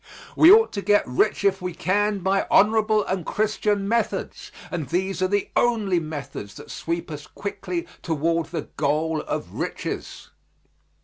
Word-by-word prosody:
We 330 Hz, -, +8 dB
ought 450 Hz, +2 st, +6 dB
to 200 Hz, -, -3 dB
get 205 Hz, +1 st, +3 dB
rich 165 Hz, +13 st, +1 dB
if 195 Hz, -1 st, +2 dB
we 180 Hz, -2 st, -4 dB
can 205 Hz, +3 st, 0 dB
by 195 Hz, +2 st, +1 dB
honorable 215 Hz, 0 st, +4 dB
and 185 Hz, -2 st, -2 dB
Christian 210 Hz, 0 st, 0 dB
methods, 230 Hz, +2 st, -2 dB, 0.2 s
and 160 Hz, -6 st, -3 dB
these 190 Hz, +2 st, -1 dB
are 185 Hz, -, +3 dB
the 205 Hz, +1 st, -1 dB
only 215 Hz, -7 st, +2 dB
methods 145 Hz, -10 st, -7 dB
that -, -, -11 dB
sweep 170 Hz, 0 st, -4 dB
us 150 Hz, 0 st, -7 dB
quickly 195 Hz, -4 st, -5 dB, 0.2 s
toward 165 Hz, 0 st, 0 dB
the -, -, -4 dB
goal 155 Hz, +2 st, 0 dB
of -, -, -5 dB
riches. -, -, -5 dB
190 Hz, 150 wpm, -24 LUFS, 165-205 Hz, 0.2 s, We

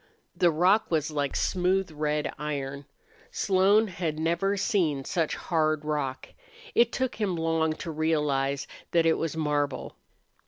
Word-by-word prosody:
The 175 Hz, -1 st, +4 dB
rock 180 Hz, +7 st, +3 dB
was 155 Hz, -2 st, 0 dB
like 145 Hz, -2 st, -2 dB
smooth 185 Hz, 0 st, +1 dB
red 150 Hz, 0 st, -1 dB
iron. 140 Hz, -2 st, -4 dB, 0.4 s
Slone 200 Hz, +3 st, +3 dB
had 170 Hz, -5 st, -3 dB
never 170 Hz, +5 st, 0 dB
seen 155 Hz, -9 st, 0 dB
such 165 Hz, -3 st, -1 dB
hard 155 Hz, -3 st, 0 dB
rock. 145 Hz, -4 st, -3 dB, 0.4 s
It 235 Hz, 0 st, +4 dB
took 260 Hz, -3 st, -2 dB
him 195 Hz, -4 st, 0 dB
long 160 Hz, -1 st, +1 dB
to 165 Hz, -, -6 dB
realize 150 Hz, -3 st, 0 dB, 0.3 s
that 165 Hz, -1 st, +4 dB
it 165 Hz, -, +3 dB
was 160 Hz, -1 st, -2 dB
marble. 145 Hz, -3 st, -1 dB
160 Hz, 135 wpm, -27 LUFS, 150-180 Hz, 0.4 s, The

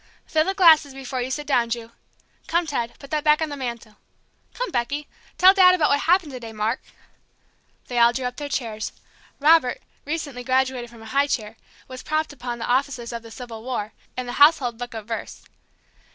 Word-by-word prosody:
Fill 310 Hz, -1 st, +1 dB
the 385 Hz, -, -1 dB
glasses 315 Hz, -7 st, +6 dB
before 265 Hz, -1 st, -4 dB
you 250 Hz, -, -3 dB
sit 295 Hz, +3 st, -3 dB
down, 245 Hz, -5 st, +2 dB
Ju. 230 Hz, -1 st, -4 dB, 0.6 s
Come, 340 Hz, +1 st, +1 dB
Ted 240 Hz, -6 st, -3 dB
put 275 Hz, -, -13 dB
that 305 Hz, -1 st, 0 dB
back 300 Hz, 0 st, +4 dB
on 315 Hz, -1 st, -1 dB
the 290 Hz, -, -5 dB
mantel. 235 Hz, -5 st, -6 dB, 0.6 s
Come, -, -, -3 dB
Becky! 280 Hz, +4 st, -2 dB, 0.3 s
Tell 375 Hz, +1 st, +8 dB
Daddy 365 Hz, -2 st, +7 dB
about 315 Hz, -5 st, +2 dB
what 285 Hz, -, +3 dB
happened 340 Hz, -1 st, +2 dB
to 255 Hz, -, -7 dB
day, 230 Hz, -2 st, -8 dB
Mark 215 Hz, +3 st, -1 dB, 0.5 s
" -, -, -40 dB
They 245 Hz, -1 st, -1 dB
all 235 Hz, 0 st, +6 dB
drew 255 Hz, +1 st, -3 dB
up 250 Hz, 0 st, -4 dB
their 290 Hz, -1 st, -5 dB
chairs. 225 Hz, -6 st, -3 dB, 0.5 s
Robert, 295 Hz, -4 st, +4 dB, 0.2 s
recently 290 Hz, -5 st, -4 dB
graduated 260 Hz, -1 st, 0 dB
from 230 Hz, -1 st, -14 dB
a 220 Hz, -, -9 dB
high 280 Hz, +1 st, +3 dB
chair, 220 Hz, -5 st, -3 dB, 0.3 s
was 255 Hz, -1 st, -8 dB
propped 310 Hz, -1 st, -1 dB
upon 245 Hz, -3 st, -5 dB
"The 230 Hz, -, -4 dB
Officers 250 Hz, -2 st, -1 dB
of 235 Hz, -, -5 dB
the 230 Hz, -, -12 dB
Civil 225 Hz, -1 st, -9 dB
War," 230 Hz, -4 st, -4 dB, 0.2 s
and 255 Hz, -1 st, -3 dB
"The 245 Hz, -, -5 dB
Household 275 Hz, -6 st, +5 dB
Book 245 Hz, -1 st, -6 dB
of 220 Hz, -2 st, -6 dB
Verse." 225 Hz, 0 st, -6 dB
260 Hz, 205 wpm, -23 LUFS, 235-295 Hz, 0.6 s, Tell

